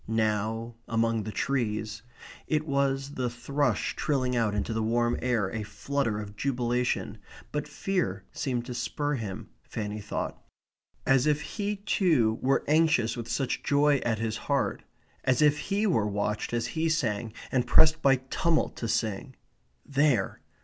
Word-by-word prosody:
Now, 110 +1 0
among 115 0 +1
the 110 - -4
trees, 110 -3 -1 0.5
it 155 0 +1
was 140 -1 0
the 125 -3 -1
thrush 125 0 -1
trilling 130 -4 0
out 110 -3 +1
into 105 +2 -1
the 110 - 0
warm 120 +2 +2
air 115 -7 +1
a 110 - -3
flutter 115 0 -2
of 105 -1 -7
jubilation, 125 0 -1 0.3
but 150 0 -2
fear 165 - -1
seemed 125 -3 -2
to 125 - -5
spur 145 +4 -2
him, 110 -8 -5
Fanny 105 -1 -5
thought; 105 - -4 0.6
as 135 +1 +4
if 150 0 +2
he 205 +5 -3
too 165 - +2
were 135 +1 +2
anxious 155 -6 +3
with 120 -1 -6
such 135 -3 -1
joy 145 0 +3
at 115 -2 +1
his 110 0 -2
heart - - +1 0.4
as 130 -2 +2
if 150 -1 +4
he 205 +2 0
were 115 - +2
watched 105 +1 -1
as 120 -1 0
he 165 0 +1
sang, 115 -8 0 0.2
and 125 -2 +1
pressed 160 +5 +6
by 135 -2 +5
tumult 135 +5 0
to 115 - -3
sing. 110 +3 -1 0.5
There! 140 -7 +1
125 Hz, 155 wpm, -28 LUFS, 110-145 Hz, 0.6 s, pressed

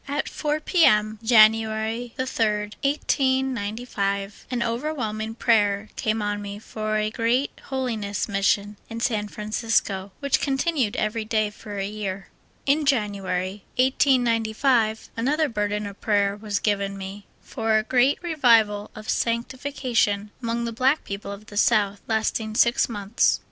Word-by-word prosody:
At 285 +2 -2
4 300 0 -2
P. 345 +1 +2
M., 215 -3 +4
January 220 +1 +3
3d, 215 -5 -1
1895, 240 -8 -1
^^ - - -1
over^vhelming 230 -3 -3
prayer 210 -3 +2
came 215 -1 -1
on 205 0 -2
me 200 0 -6
for 215 0 -3
a 215 0 0
great 240 +4 +1
Holiness 230 -7 -2
Mission 200 0 0
in 230 - -5
San 215 -3 0
Francisco, 210 -2 -1
which 280 -1 +1
continued 270 -4 0
every 215 +1 -1
day 215 -1 0
for 210 -1 -9
a 195 - -1
year. 200 -2 -5 0.4
In 290 +3 +3
July, 200 -7 -1 0.2
1895, 240 -3 +2
another 295 +7 +1
burden 210 -3 -2
of 200 0 -9
prayer 200 -2 +2
was 210 -1 -3
given 200 -1 -1
me 195 +1 -8
for 225 -1 0
a 215 - +1
great 255 +4 +3
Revival 230 -10 +3
of 215 0 -10
sanctification 235 -3 0
among 235 0 -2
the 230 - -3
black 260 +6 +2
people 200 0 -6
of 200 +1 -9
the 205 - -9
South, 205 -2 +2
lasting 220 0 -1
six 235 +2 +3
months. 205 0 +1
220 Hz, 140 wpm, -24 LUFS, 205-245 Hz, 0.4 s, M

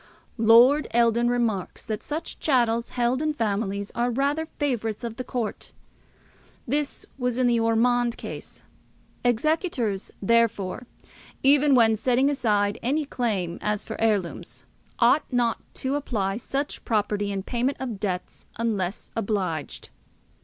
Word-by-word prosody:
Lord 240 +7 +6
Eldon 235 0 +3
remarks, 230 -6 -1
that 215 -1 -3
such 315 +3 -5
chattels 235 -5 +2
held 245 +2 0
in 305 -1 0
families 200 -4 -2
are 240 +1 0
"rather 285 +6 0
favourites 235 -6 -1
of 230 -1 -5
the 255 - -3
court." 240 -4 -4 0.9
This 285 +3 -2
was 250 -1 -1
in 255 - +2
the 240 -1 +3
Ormonde 235 +1 +2
case. - - -8 0.6
Executors, 245 - 0
therefore, 230 0 +1 0.6
even 280 +1 +5
when 225 -2 +5
setting 255 +5 +2
aside 210 -6 +1
any 290 +5 0
claim 205 -11 -2
as 210 -1 -1
for 220 - -7
heirlooms, 175 - -1 0.3
ought 250 +6 +3
not 240 -2 +1 0.2
to 265 +1 -2
apply 215 -9 -1
such 275 +4 -3
property 205 -2 0
in 195 -1 -3
payment 250 +5 -1
of 245 -6 -4
debts 185 -3 -4
unless 210 -5 -2
obliged. 195 -8 -2
235 Hz, 130 wpm, -25 LUFS, 210-255 Hz, 0.9 s, Lord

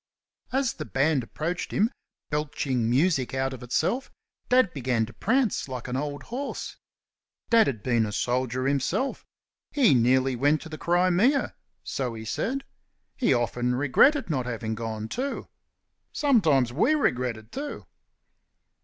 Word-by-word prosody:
As 265 -1 +1
the 155 - -6
band 145 0 +1
approached 165 +9 -4
him, 220 +4 +2 0.4
belching 140 -5 -1
music 135 0 +2
out 135 0 -1
of 130 - -9
itself, 165 - -1 0.4
Dad 250 -7 +4
began 125 -4 0
to 115 - -13
prance 230 - +1
like 130 -2 -6
an 125 - -3
old 145 +1 -3
horse. 265 +4 -5 0.8
Dad 230 -2 +6
had 115 -6 -3
been 120 -3 +2
a - - -5
soldier 125 +3 -1
himself. 140 - 0 0.5
He 265 - +4
nearly 130 +2 +3
went 145 +5 +2
to 160 - -9
the 155 -1 -8
Crimea 185 +10 +2 0.3
so 125 -4 -3
he 110 0 -7
said. 265 - -2 0.5
He 255 - +1
often 125 0 +1
regretted 200 - +4
not 130 -7 -1
having 110 -2 -3
gone, 110 -1 -4
too. 265 - -4 0.6
Sometimes 160 - +3
we 240 - +3
regretted 125 - -1
too. 290 +1 -6
135 Hz, 140 wpm, -26 LUFS, -, 0.8 s, Dad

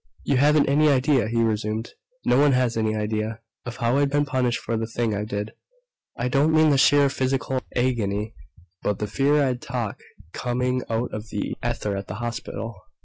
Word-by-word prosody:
"You 140 - +1
haven't 150 +2 +4
any 150 +2 +4
idea," 135 -3 +3
he 115 +1 +1
resumed, 110 0 -1 0.3
"no 125 - +4
one 145 -1 +5
has 125 -2 +1
any 110 -1 0
idea, 110 +1 -2 0.3
of 120 - -6
how 120 +3 +1
I've 145 -1 +2
been 145 +1 +1
punished 130 -4 0
for 115 - -3
the 110 0 -2
thing 115 -1 -1
I 105 0 -2
did. 105 0 -4 0.7
I 120 - -1
don't 140 +5 +3
mean 155 -1 +5
the 140 - +3
sheer 145 +1 +5
physical 130 -1 -1
agony 110 -4 0 0.5
but 105 - -1
the 105 - -2
fear 135 +7 +1
that 145 -1 +4
I'd 125 -1 -2
talk 120 -4 -4 0.3
coming 125 +1 -1
out 115 +2 -1
of 110 +1 -6
the - - -3
ether 105 -1 -2
at 100 0 -5
the - - -6
hospital. 115 0 -5
120 Hz, 195 wpm, -24 LUFS, 110-135 Hz, 0.7 s, one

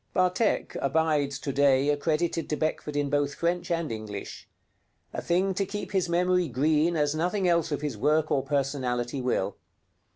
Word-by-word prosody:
'Vathek' 185 +4 +1
abides 145 -1 +1
to 140 0 -4
day 140 0 +3
accredited 160 +3 0
to 150 - 0
Beckford 155 -1 -2
in 145 -1 +1
both 145 -1 +1
French 175 +1 -1
and 165 -4 -1
English; 110 -2 -7 0.6
a - - -3
thing 185 +3 +1
to 195 - 0
keep 205 +2 -5
his 190 -3 0
memory 180 0 +2
green 155 +6 +2
as 150 -1 +1
nothing 180 +4 0
else 170 -2 +2
of 145 - -2
his 140 -8 -4
work 155 +4 +2
or 135 - +3
personality 135 -2 -1
will. 125 0 -1
150 Hz, 165 wpm, -27 LUFS, 140-170 Hz, 0.6 s, day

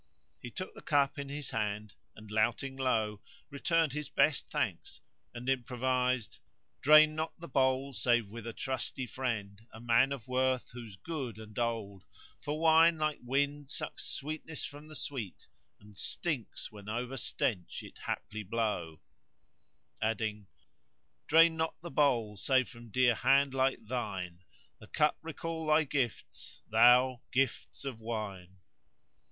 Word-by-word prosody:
He 125 - -7
took 185 +9 -6
the - - -11
cup 145 -1 +2
in 140 -1 -5
his 145 0 -4
hand 105 -2 -2 0.2
and, 105 -1 -12
louting 120 +5 +1
low, 110 -6 0 0.3
returned 160 +1 +1
his 150 -1 -4
best - - +2
thanks - - -2 0.3
and 120 +1 -8
improvised:— 125 -2 0 0.4
"Drain 155 +2 +8
not 160 +2 -4
the 170 - -8
bowl 135 -1 +1
save 120 0 +2
with 115 +2 -8
a - - -3
trusty 130 0 -2
friend 110 -6 -3
* - - -35
A 110 - -11
man 120 +3 +3
of 130 -4 -5
worth 130 0 +1
whose 115 -5 -9
good 130 - -5
old 110 -1 -10
blood 120 - +1
all 100 -4 -6
know: - - -28 0.4
For 150 +1 -3
wine, 165 +1 +6
like 155 -1 0
wind, 140 +3 0
sucks - - -3
sweetness 155 +1 -4
from 145 +2 -9
the 155 - -10
sweet 125 -11 -5 0.2
* 75 0 -46
And 105 0 -17
stinks 145 - -3
when 105 -1 -10
over 120 +4 -3
stench 110 -6 -1
it - - -12
haply 110 - -4
blow:" 100 -7 -2 1.0
Adding:— 105 -2 -1 0.8
Drain 165 +1 +6
not 160 0 -2
the 170 0 -7
bowl; 120 -8 +2
save 130 +5 +2
from 120 -1 -12
dear 125 +2 +4
hand 135 +4 +3
like 130 -3 +1
thine 95 -7 -4 0.2
* - - -34
The - - -13
cup 150 0 +2
recall 165 0 -5
thy 155 +1 +5
gifts; 135 -5 -3
thou, 125 +2 +6
gifts 135 +1 -1
of 130 -5 -4
wine." 100 -5 -5
125 Hz, 155 wpm, -32 LUFS, 110-145 Hz, 1.0 s, Drain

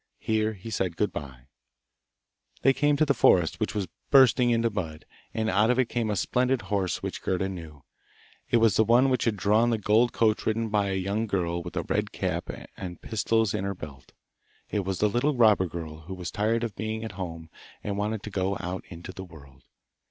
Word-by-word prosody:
Here 110 0 0
he 105 +3 -9
said 95 -5 -1
good 105 - +1
bye. 65 -4 -7 1.2
They 135 - +6
came 145 +2 +2
to 155 - +4
the 140 - +3
forest, 90 -8 +3
which 110 +1 -2
was 100 -3 -1 0.2
bursting 130 -2 +6
into 115 -1 +2
bud, 80 -6 -5 0.3
and 110 -1 -1
out 105 +3 +3
of 125 - +3
it 130 -2 +2
came 115 -3 -1
a 105 - 0
splendid 125 +5 +1
horse 100 -4 -1
which - - -4
Gerda 95 0 0
knew; 80 -7 -8 0.7
it - - +4
was 115 -4 +4
the 110 - +6
one 120 +4 +4
which 130 - +1
had 110 -3 +1
drawn 105 +5 +3
the 115 - +1
gold 110 +3 +3
coach 110 -2 +1
ridden 110 0 0
by 105 -1 +1
a 95 - -1
young 100 +4 -1
girl 85 -4 -1
with 90 0 -7
a - - 0
red - - -1
cap - - -3
on - - -7
and 90 -2 -7
pistols 110 -1 +1
in 105 -3 -2
her 100 0 -2
belt. 70 -6 -10 0.6
It 105 - 0
was 95 -1 -2
the 105 - +3
little 125 +7 +1
robber 110 -6 +5
girl 80 -2 -7
who 90 +5 -8
was 90 -4 -6
tired 115 +5 0
of 115 -3 -3
being 110 0 -3
at 110 - -5
home 85 -4 -7 0.3
and 100 - -2
wanted 105 +1 -2
to 105 - -7
go 95 +1 -1
out 90 +1 -4
into 85 +1 -8
the 95 - -7
world. 70 -7 -15
105 Hz, 215 wpm, -27 LUFS, 90-115 Hz, 1.2 s, They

